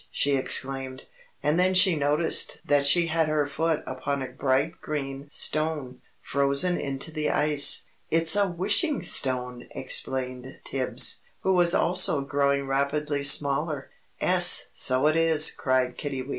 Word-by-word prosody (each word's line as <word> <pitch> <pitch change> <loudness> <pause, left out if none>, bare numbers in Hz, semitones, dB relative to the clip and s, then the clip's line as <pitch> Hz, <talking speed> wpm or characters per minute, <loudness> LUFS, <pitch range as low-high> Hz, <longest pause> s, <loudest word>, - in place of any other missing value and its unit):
she 140 0 -1
exclaimed, 135 0 -3 0.4
and 150 +4 0
then 185 +1 +1
she 185 -1 +4
noticed 150 +2 0
that 145 -2 +1
she 170 +3 +3
had 165 -1 -1
her 155 -1 0
foot 160 +2 -2
upon 135 +1 -4
a - - -6
bright 140 +5 -2
green 140 -2 -6
stone, 150 -4 -2 0.2
frozen 140 +6 0
into 135 +3 -5
the 155 -1 -3
ice. 150 -1 +3 0.3
"It's 165 +2 +3
a 205 -1 +1
Wishing 205 - 0
Stone!" 125 -2 0
explained 130 0 -3
Tibbs, 130 -2 -1 0.2
who 190 - 0
was 175 -2 +2
also 175 -4 +3
growing 140 0 -1
rapidly 140 +2 -2
smaller. 140 +1 +1 0.3
"'Es, - - +4
so 130 +2 +1
it 155 +1 +2
is," 160 -1 +4
cried 130 -1 -2
Kiddiwee. 135 -2 -6
145 Hz, 140 wpm, -25 LUFS, 135-160 Hz, 0.4 s, she